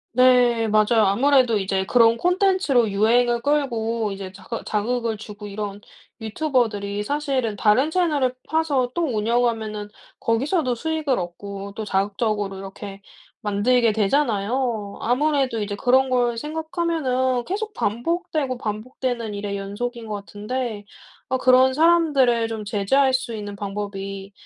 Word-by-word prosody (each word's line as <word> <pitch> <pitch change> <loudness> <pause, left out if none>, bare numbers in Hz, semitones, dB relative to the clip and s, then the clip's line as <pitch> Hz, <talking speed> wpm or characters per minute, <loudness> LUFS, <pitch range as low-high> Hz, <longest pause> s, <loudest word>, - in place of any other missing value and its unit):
네, 245 -2 +4
맞아요. 215 +1 +3
아무래도 250 +1 +3
이제 190 -1 -1
그런 230 -1 +5
콘텐츠로 360 - +2
유행을 235 +3 +2
끌고 235 -7 0
이제 195 -1 -7
자극 205 +4 -7
자극을 230 +1 -1
주고 210 0 -9
이런 205 0 -5 0.4
유튜버들이 220 -5 -1
사실은 265 -3 -1
다른 220 +8 +3
채널을 300 -7 +1
파서 285 -6 0
또 345 - -1
운영하면은 220 -3 -1 0.3
거기서도 255 +3 0
수익을 310 -1 -1
얻고 195 +3 -6
또 220 - -4
자극적으로 205 0 -1
이렇게 195 +1 -9 0.4
만들게 220 +3 +2
되잖아요. 220 -1 0
아무래도 265 -1 +1
이제 205 0 -4
그런 260 +4 +2
걸 240 -2 +1
생각하면은 305 -4 -1
계속 420 +3 -3
반복되고 270 - -2
반복되는 230 +1 -4
일의 200 0 -4
연속인 225 +4 -5
것 215 - -5
같은데 210 +2 -5 0.4
어 260 - 0
'그런 255 +1 +5
사람들을 290 -7 +3
좀 220 -2 -5
제재할 255 +7 +2
수 250 -3 -3
있는 205 -1 -6
방법이 195 -1 -5
235 Hz, 315 characters per minute, -23 LUFS, 205-260 Hz, 0.4 s, 그런